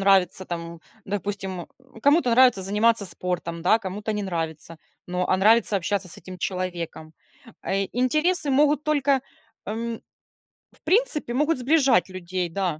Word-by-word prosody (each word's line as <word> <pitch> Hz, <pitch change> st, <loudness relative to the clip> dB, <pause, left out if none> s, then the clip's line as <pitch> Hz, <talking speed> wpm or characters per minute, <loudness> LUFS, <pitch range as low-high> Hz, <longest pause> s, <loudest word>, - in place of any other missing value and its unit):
нравится 190 Hz, -1 st, +3 dB
там, 170 Hz, -1 st, -6 dB, 0.3 s
допустим, 195 Hz, -2 st, -4 dB, 0.4 s
кому-то 285 Hz, -2 st, +4 dB
нравится 240 Hz, -5 st, +5 dB
заниматься 210 Hz, +2 st, +2 dB
спортом, 170 Hz, -1 st, -3 dB
да, 220 Hz, +5 st, +4 dB
кому-то 210 Hz, +1 st, -4 dB
не 210 Hz, -1 st, -2 dB
нравится, 165 Hz, -3 st, -4 dB, 0.3 s
но, 180 Hz, 0 st, -1 dB
а 185 Hz, -, +3 dB
нравится 215 Hz, +1 st, +4 dB
общаться 195 Hz, 0 st, -2 dB
с -, -, -9 dB
этим 185 Hz, -1 st, -10 dB
человеком. 175 Hz, -4 st, -4 dB, 0.5 s
Э, 195 Hz, 0 st, 0 dB
интересы 305 Hz, +6 st, +1 dB
могут 295 Hz, +2 st, +3 dB
только, 285 Hz, -3 st, +2 dB, 0.5 s
м, 230 Hz, +2 st, -4 dB, 0.7 s
в -, -, -25 dB
принципе, 370 Hz, -, +1 dB
могут 300 Hz, +3 st, +1 dB
сближать 260 Hz, -, +3 dB
людей, 185 Hz, -1 st, -4 dB
да, 175 Hz, -3 st, -2 dB
200 Hz, 135 wpm, -24 LUFS, 180-250 Hz, 0.7 s, нравится